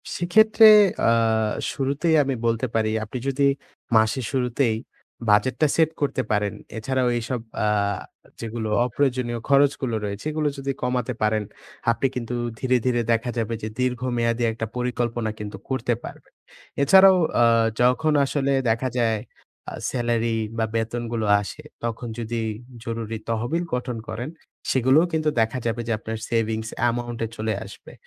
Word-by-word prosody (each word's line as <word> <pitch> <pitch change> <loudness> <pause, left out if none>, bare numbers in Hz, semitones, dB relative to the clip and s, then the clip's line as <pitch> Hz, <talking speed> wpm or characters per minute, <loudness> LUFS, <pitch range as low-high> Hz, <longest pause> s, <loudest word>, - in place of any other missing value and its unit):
সেক্ষেত্রে 220 +5 +5 0.4
আ - - +5 0.6
শুরুতেই 140 +4 0
আমি 135 -1 -1
বলতে 115 +1 +1
পারি, 110 -1 +1
আপনি 110 +4 -6
যদি 140 +1 +2 0.5
মাসের 110 +3 +3
শুরুতেই 125 -2 +1 0.5
বাজেটটা 130 +8 +3
set 160 -2 +4
করতে 140 -2 0
পারেন, 105 -1 +1 0.2
এছাড়াও 130 +3 0
এইসব 120 +2 -3 0.3
আ - - +2 0.7
যেগুলো 115 -1 -4 0.2
অপ্রয়োজনীয় 125 -2 -1
খরচগুলো 140 -3 +3
রয়েছে, 100 +3 -5
এগুলো 155 -1 0
যদি 135 0 -2
কমাতে 125 0 -1
পারেন, 110 0 +1 0.5
আপনি 125 +3 +1
কিন্তু 125 0 -3 0.2
ধীরে, 130 -1 +2
ধীরে 120 -1 +2
দেখা 115 +2 +1
যাবে 115 0 -1
যে 110 - -2
দীর্ঘমেয়াদী 120 -2 0
একটা 115 0 -4
পরিকল্পনা 120 -2 -1
কিন্তু 105 -1 -6
করতে 125 -2 0
পারবেন। - - -11 0.5
এছাড়াও 190 +5 +7 0.3
আ - - +6 0.4
যখন 150 +6 +3
আসলে 140 0 0 0.2
দেখা 115 +3 +1
যায়, 115 -2 +2 0.5
আ - - -10 0.2
স্যালারি 120 -2 0 0.2
বা, 110 - +1
বেতনগুলো 115 0 -2 0.2
আসে, 140 +9 -8 0.2
তখন 120 +1 -3
যদি 115 0 -3 0.4
জরুরি 115 -2 -4
তহবিল 120 +10 -1
গঠন 125 -1 -2
করেন, 120 +6 -4 0.4
সেগুলোও 135 +6 +4
কিন্তু 155 -1 +1
দেখা 115 +3 0
যাবে 115 0 -1
যে, - - -1
আপনার 110 0 -5
সেভিংস 110 -1 -1 0.2
amount 120 0 -4
এ - - -4
চলে 110 0 -1
আসবে। - - -13
120 Hz, 140 wpm, -24 LUFS, 115-135 Hz, 0.7 s, এছাড়াও